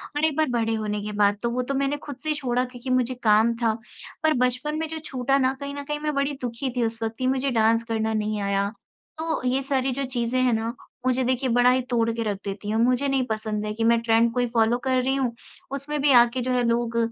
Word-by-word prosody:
और 295 +2 +2
एक 315 -2 +1
बार 315 - +4
बड़े 225 -2 0
होने 210 -1 -2
के 210 +1 -5
बाद, 205 0 +3
तो 235 - +1
वो 245 +2 -1
तो 265 +2 -3
मैंने 275 +1 0
खुद 290 -1 -8
से 310 - 0
छोड़ा 250 -4 0
क्योंकि 250 0 -9
मुझे 255 0 +2
काम 220 +2 +4
था। 230 -2 +1 0.5
पर 315 0 +4
बचपन 250 +5 -2
में 320 - -2
जो 320 0 -5
छूटा 265 +1 0
ना 260 -1 +2
कहीं 280 0 -5
न 285 - -5
कहीं 295 +1 -3
मैं 300 0 -2
बड़ी 280 +1 0
दुखी 245 +2 -3
थी 245 - +2
उस 225 0 -4
वक़्त 225 0 -2
कि 255 - 0
मुझे 265 +1 +1
डांस 225 0 +3
करना 220 -1 -1
नहीं 215 -1 -1
आया। 200 0 0 0.5
तो 320 0 -2
ये 260 +2 +1
सारी 270 -1 0
जो 275 - -2
चीज़ें 250 -1 -1
हैं 250 -2 +3
ना, 225 +1 -1 0.3
मुझे 255 0 +2
देखिए 255 +1 0
बड़ा 245 +1 +5
ही 255 0 +2
तोड़ 230 -2 +2
के 230 - -2
रख 205 -3 -2
देती 200 +1 -5
हैं। 220 - 0
मुझे 250 +4 +2
नहीं 270 -2 +1
पसंद 215 -1 -2
है 210 - -3
कि 225 +1 -2
मैं 230 0 +4
ट्रेंड 230 0 +3
को 250 - -1
ही 245 - +2
फ़ॉलो 230 0 +2
कर 260 0 +3
रही 265 +2 0
हूँ। 260 -3 0 0.4
उसमें 280 +2 -3
भी 285 0 +4
आके 240 +2 0
जो 255 +1 -1
है 250 -1 +2
लोग 235 0 0
245 Hz, 260 wpm, -25 LUFS, 225-270 Hz, 0.5 s, बड़ा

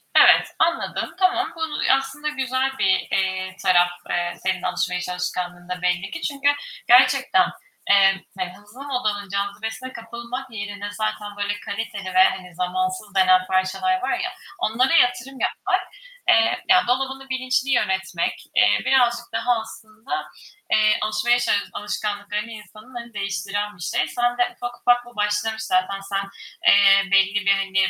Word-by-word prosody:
Evet, - - +7
anladım, 340 +1 0
tamam 380 +1 +1
bunu, 320 -2 -3
aslında 270 +3 -4
güzel 265 -2 -1
bir, 190 -1 +3
eee, 190 -1 -1
taraf, 175 -1 +4 0.2
eee, 175 0 -1
senin 185 -1 0
alışveriş 180 0 -2
alışkanlığında 180 0 -4
belli 180 +1 -1
ki. 325 - -6
Çünkü 285 0 0 0.4
gerçekten, 255 -5 +5 0.4
eee, 195 -1 +5 0.2
hani, 180 -1 -4
hızlı 210 +6 -13
modanın 215 -8 -2
cazibesine 215 +6 -4
kapılmak 235 +3 -7
yerine 205 -1 -6
zaten 210 -1 -4
böyle 205 0 -2
kaliteli 200 -3 -5
ve 185 - +8
hani, 180 -2 -8
zamansız 290 - -3
denen 185 -1 +5
parçalar 190 - 0
var - - -1
ya, - - -3 0.3
onlara 255 +6 +1
yatırım 245 -2 +2
yapmak, 380 -1 0 0.5
eee, 225 +8 +3
ya 370 -8 +5
dolabını 265 +1 -1
bilinçli 260 +1 -1
yönetmek, 190 -6 -1
eee, 105 0 +4
birazcık 240 -2 +3
daha 230 +1 +1
aslında, 220 +10 -7 0.5
eee, 215 0 +4
alışmaya 215 +3 +2
çalış 205 -4 +1
alışkanlıklarını 205 +1 -4
insanın, 215 +3 -13
hani, 235 -1 -8
değiştiren 200 +1 -3
bir - - -14
şey. - - 0
Sende 245 0 0
ufak 245 0 -7
ufak 245 0 +3
bu 240 0 -15
başlamış 210 +1 -1
zaten, 185 +1 0
sen, 195 0 -3 0.4
eee, 195 0 +6
belli 195 +1 +3
bir, 200 - +5
hani, 195 -1 +1
210 Hz, 140 wpm, -22 LUFS, 195-250 Hz, 0.5 s, ve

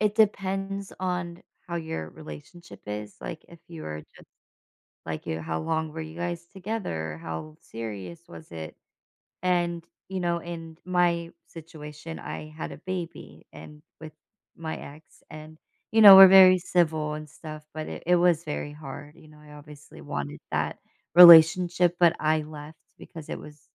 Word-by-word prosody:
it 210 -1 +1
depends 195 -2 0
on 180 -2 -4 0.2
how 170 - -4
your 160 - -5
relationship 125 - -12
is, 105 0 -6
like, 160 - -8
if 170 - -15
you 165 -2 -9
were 75 0 -6
just - - -18 0.8
like, - - -6
you 80 0 -3
how 80 0 -3
long 160 - -2
were 160 +1 -6
you 160 0 -9
guys 175 0 -4
together? 180 - -5
How 80 -2 -7
serious 100 -6 -8
was 80 -1 -13
it? 80 -1 -8 0.7
And, 175 -1 0 0.3
you 190 - -4
know, 170 -1 -1
in 165 -1 -9
my 175 -2 +1 0.2
situation, 160 -1 -10
I 155 - -7
had 155 +1 -7
a - - -11
baby 180 -3 -7
and 150 0 -13 0.2
with 155 -1 -9 0.5
my 160 -1 -5
ex. 150 +3 -14
And, 155 +1 -11 0.4
you 225 - +5
know, 200 -2 +12
we're 195 0 +12
very 185 -1 +8
civil 160 -4 0
and 155 0 -8
stuff, 155 0 -10
but 155 0 -6
it - - -8
it 180 +1 +4
was 170 -2 +2
very 150 -1 -5
hard. 145 0 -10
You 155 - -18
know, 150 0 -18
I 150 0 -15
obviously 150 0 -14
wanted 70 +1 -5
that - - -2 0.4
relationship, 175 +1 +8
but 175 -1 +5
I 155 0 +1
left 150 0 -10 0.2
because 160 -3 -12
it - - -5
was 150 -1 -13
160 Hz, 165 wpm, -26 LUFS, 150-175 Hz, 0.8 s, know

